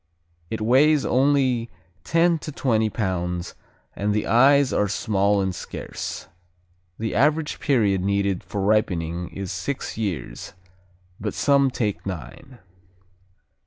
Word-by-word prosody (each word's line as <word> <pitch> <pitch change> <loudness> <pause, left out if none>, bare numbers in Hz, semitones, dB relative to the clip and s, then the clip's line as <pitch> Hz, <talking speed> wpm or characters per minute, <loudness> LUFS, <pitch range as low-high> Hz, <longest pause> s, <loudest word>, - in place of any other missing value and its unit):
It 110 - -4
weighs 135 +6 +4
only 130 -3 +2 0.3
ten 165 0 +2
to 150 - -7
twenty 110 -6 +1
pounds 90 -4 -3 0.4
and 105 +1 -1
the 105 - 0
eyes 135 +3 +4
are 105 - +2
small 100 0 +1
and 95 -1 -1
scarce. 90 - -6 0.7
The 110 0 -3
average 150 +5 +1
period 105 - +2
needed 100 -1 0
for 100 - -4
ripening 90 -5 0
is 100 -2 -6
six 110 +5 -4
years, 80 - -4 0.7
but 105 0 -4
some 140 -1 +3
take 105 -5 -2
nine. 95 - -8
110 Hz, 120 wpm, -23 LUFS, 95-135 Hz, 0.7 s, weighs